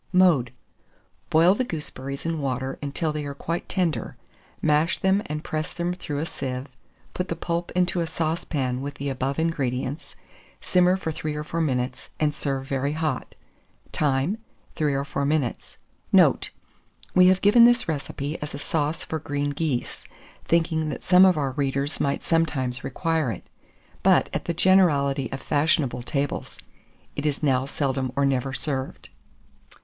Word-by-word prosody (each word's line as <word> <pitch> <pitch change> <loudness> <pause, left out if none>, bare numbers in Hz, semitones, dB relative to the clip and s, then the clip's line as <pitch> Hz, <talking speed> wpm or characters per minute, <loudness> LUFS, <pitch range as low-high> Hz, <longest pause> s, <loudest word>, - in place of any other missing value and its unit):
Mode. 175 -10 +4 0.8
Boil 165 +4 +6
the 255 - 0
gooseberries 140 - -5
in 165 -2 -1
water 130 0 -2
until 150 +2 -2
they 150 -1 -3
are 140 -1 -5
quite 165 +4 -4
tender; 180 -5 -1 0.4
mash 155 +2 +2
them 190 +1 +2
and 150 +1 -4
press 155 +1 -3
them 175 0 -1
through 160 -5 -5
a 150 - -1
sieve; 130 -5 -4 0.5
put 180 - -2
the 170 - -2
pulp 170 +1 -3
into 180 -1 +2
a 165 - -1
saucepan 155 -6 -2
with 145 +1 -5
the 140 0 -3
above 135 +1 -2
ingredients; 140 -3 -2 0.4
simmer 180 0 +3
for 165 -4 -3
3 155 0 -4
or 150 - -3
4 165 +2 -2
minutes, 125 -4 -1
and 150 -1 +2
serve 135 -2 -2
very 140 +1 -1
hot. 155 0 -2 0.6
Time. 145 +8 +1 0.4
3 150 -3 +1
or 140 +1 -1
4 140 0 -2
minutes. 140 -4 -1 0.3
Note. - - +5 0.6
We 180 0 +7
have 185 0 +5
given 235 +4 +8
this 240 0 +4
recipe 145 -1 -3
as 150 -1 -5
a - - -4
sauce 150 +2 -2
for 160 - -3
green 145 0 -2
geese, 145 -4 -3 0.4
thinking 160 -2 +1
that 145 - -5
some 180 +1 +7
of 185 -3 +4
our 140 -3 0
readers 140 +1 -1
might 140 0 0
sometimes 140 -7 0
require 160 -1 0
it; 95 - -7 0.6
but, - - +4
at - - -2
the 170 - -1
generality 145 -8 +3
of 135 - -5
fashionable 145 -4 +1
tables, 140 +3 -3 0.6
it 145 - -3
is 145 +1 -2
now 135 -2 +2
seldom 135 -3 -1
or 140 0 +2
never 135 -1 0
served. 135 -1 -3
150 Hz, 160 wpm, -25 LUFS, 135-165 Hz, 0.8 s, given